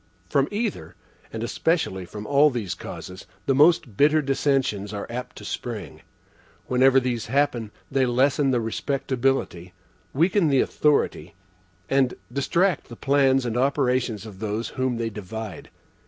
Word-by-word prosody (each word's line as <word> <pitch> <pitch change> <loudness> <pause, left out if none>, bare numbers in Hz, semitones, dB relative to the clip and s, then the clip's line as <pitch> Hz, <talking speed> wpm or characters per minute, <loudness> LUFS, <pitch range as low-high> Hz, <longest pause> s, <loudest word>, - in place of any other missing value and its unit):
From 140 +5 +2
either, 215 0 -3 0.4
and 110 0 -5
especially 120 - -1
from 105 +4 -8
all 145 +5 +5
these 115 -9 -3
causes, 95 0 -9 0.2
the 135 - +2
most 150 - +4
bitter 150 +2 +5
dissensions 135 -7 0
are 100 - -4
apt 125 +1 -6
to - - -10
spring. - - -6 0.6
Whenever 130 +1 +4
these 125 -3 -2
happen, 130 -3 0 0.2
they 135 -1 +2
lessen 135 +3 +2
the 125 -2 +2
respectability, 125 -6 -1 0.4
weaken 170 +5 +2
the 135 -3 +3
authority, 150 +2 +1 0.5
and 135 0 +2 0.2
distract 170 +6 +1
the 120 - -8
plans 135 0 +2
and 120 -1 -2
operation 130 -2 +1
of 100 -4 -10
those 110 +2 -3
whom 130 -2 -1
they 115 -1 -2
divide. 105 +1 -7
130 Hz, 140 wpm, -24 LUFS, 115-140 Hz, 0.6 s, all